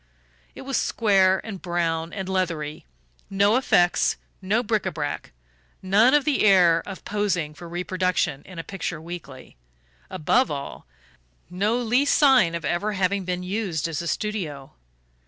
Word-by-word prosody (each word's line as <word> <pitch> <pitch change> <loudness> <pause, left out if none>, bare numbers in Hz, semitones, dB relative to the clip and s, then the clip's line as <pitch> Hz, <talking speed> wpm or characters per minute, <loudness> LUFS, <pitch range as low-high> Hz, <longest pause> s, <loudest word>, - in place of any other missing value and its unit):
It - - -9
was 270 0 -2
square 190 -4 +3
and 200 -5 -7
brown 170 -2 -1
and 195 -2 -5
leathery: 165 - -3 0.4
no 200 +2 +3
"effects"; 175 -9 +2 0.2
no 210 +6 +1
bric 215 -4 0
a - - -1
brac, 150 -3 -4 0.5
none 215 +8 +4
of 295 - +2
the 295 -3 +1
air 180 -5 +5
of 195 - -8
posing 195 -7 -1
for 170 +2 -11
reproduction 180 -4 -1
in 185 - -11
a 165 - -4
picture 180 -3 -5
weekly 160 - -10 0.5
above 185 - +1
all, 140 -1 -6 0.6
no 205 +6 0
least 245 +4 +2
sign 260 - +5
of 165 -3 -5
ever 185 +8 -1
having 195 0 0
been 180 0 -3
used 180 -5 -2
as 165 -2 -3
a 170 - -5
studio. 165 -11 -4
185 Hz, 150 wpm, -24 LUFS, 170-210 Hz, 0.6 s, air